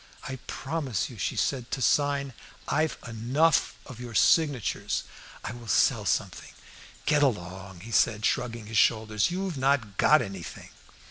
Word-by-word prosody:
"I 130 -2 -5
promise 135 - -3
you," 115 - -11
she - - -1
said, 125 -3 -1
"to - - -3
sign 140 0 +1 0.2
" - - -24
"I've 155 +2 0
enough 130 +8 +1
of 125 -4 -10
your 120 -2 -8
signatures." 145 -6 +2 0.4
"I - - -4
will 120 -1 -10
sell - - +3
something." - - -1 0.6
"Get 150 -1 +3
along!" 95 -7 -2
he 115 +4 -10
said, 110 -1 +2
shrugging 115 -2 -1
his 110 0 +1
shoulders; 110 -2 +2
"you've 180 -4 -3
not 130 -7 +1
got 155 +1 +5
anything." 95 -3 -8
125 Hz, 150 wpm, -27 LUFS, 110-145 Hz, 0.6 s, got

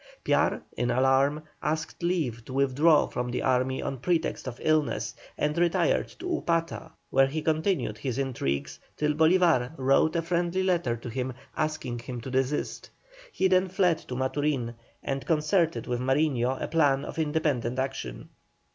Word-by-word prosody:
Piar, - - +2
in 120 +1 -1
alarm, 135 +4 +3 0.2
asked 155 +2 -3
leave 155 -10 -1
to 130 - -8
withdraw 140 +4 +4
from 125 0 -3
the 120 - -2
army 130 0 +1
on 135 - -4
pretext 165 -1 -1
of 120 -1 -6
illness, 155 -2 +1 0.2
and 150 0 0
retired 175 - +2
to - - -11
Upata, 165 - -1 0.2
where 135 0 +5
he 155 +3 -3
continued 160 - 0
his 130 -1 -3
intrigues 115 - -2 0.2
till 150 0 +1
Bolívar 160 -4 +3
wrote 135 +5 +3
a 165 - +1
friendly 175 +2 0
letter 175 -10 +1
to 115 - -9
him 130 +2 -3 0.2
asking 150 -6 -2
him 120 +1 -6
to 130 - -7
desist. 130 +2 -1 0.4
He 190 - +2
then 185 0 +3
fled 180 -3 +2
to 125 - -7
Maturin 130 -2 -1 0.3
and 135 0 -2
concerted 165 +1 +1
with 125 -1 -2
Mariño 130 -1 +1
a - - -3
plan 145 -4 +2
of - - -6
independent 150 -6 0
action. 130 - -4
145 Hz, 155 wpm, -27 LUFS, 130-165 Hz, 0.4 s, where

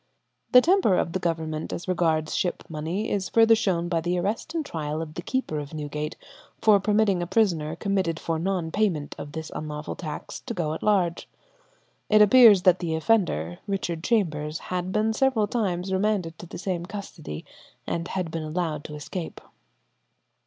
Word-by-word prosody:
The 250 - +9
temper 355 - +3
of 165 - 0
the 185 - 0
Government 160 -2 -2
as 175 - -5
regards 160 -3 +1
ship 180 - -1
money 165 +7 -3
is 190 -3 -1
further 225 0 +6
shown 185 -6 +1
by 170 -2 0
the 175 +2 0
arrest 215 - -2
and 320 -2 -1
trial 155 - -3
of 160 -1 -5
the 175 - -5
keeper 175 - -2
of 145 +1 -7
Newgate 150 0 -4 0.4
for 210 -2 +5
permitting 205 -2 +2
a 175 - -2
prisoner 170 -6 +1
committed 185 -3 -1
for 165 -1 -2
non 175 -2 -1
payment 175 -9 0
of 145 0 -7
this 160 -1 -6
unlawful 150 0 -5
tax 155 -4 -6
to 235 - -6
go 155 -3 -1
at 160 - -6
large. 185 -5 +1 0.8
It 215 - +6
appears 210 -3 +8
that 180 0 +5
the 165 -3 -1
offender, 160 - +1
Richard 175 -5 -2
Chambers, 155 -9 0 0.2
had 180 0 -2
been 215 +2 +1
several 260 -3 +2
times 190 -4 -1
remanded 190 -4 0
to 175 - -9
the - - -8
same 180 -2 -2
custody, 185 - -7 0.4
and 170 0 -2
had 180 -3 -3
been 165 - -3
allowed 155 -1 -2
to 150 - -7
escape. 160 +3 -6
175 Hz, 175 wpm, -26 LUFS, 160-205 Hz, 0.8 s, The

